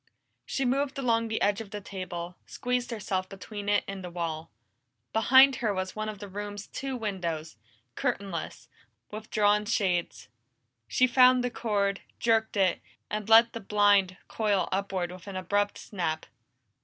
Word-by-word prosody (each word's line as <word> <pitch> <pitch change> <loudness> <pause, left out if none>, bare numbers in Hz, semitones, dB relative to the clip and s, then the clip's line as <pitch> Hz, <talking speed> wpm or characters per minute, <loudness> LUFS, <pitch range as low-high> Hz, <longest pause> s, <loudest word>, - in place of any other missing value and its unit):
She 270 - -1
moved 275 +3 0
along 230 -4 +1
the 220 0 -1
edge 205 +1 +2
of 215 - -9
the 210 0 -5
table, 180 -3 -6
squeezed 250 -1 -2
herself 190 -5 -3
between 205 +1 -6
it 205 - +3
and 195 -1 -6
the 180 - -5
wall. 165 -2 -4 0.6
Behind 260 +4 +6
her 215 -4 0
was 185 0 -3
one 215 0 -3
of 215 - -6
the 205 +1 -8
room's 205 +1 -6
two 265 -1 -5
windows, 170 -8 -3 0.4
curtainless, 190 +5 -3 0.4
with 215 +1 -8
drawn 210 0 +3
shades. 190 - -1 0.6
She 255 - +3
found 255 0 +5
the 245 - -1
cord, 200 -4 -1 0.2
jerked 225 -2 +1
it, 190 -3 +2 0.3
and 215 0 -3
let 230 +1 +7
the 230 - -4
blind 205 -3 +3
coil 210 -3 0
upward 190 -2 -1
with 180 +1 -11
an 195 - -6
abrupt 205 +2 0
snap. 160 -6 -3
205 Hz, 155 wpm, -28 LUFS, 185-225 Hz, 0.6 s, let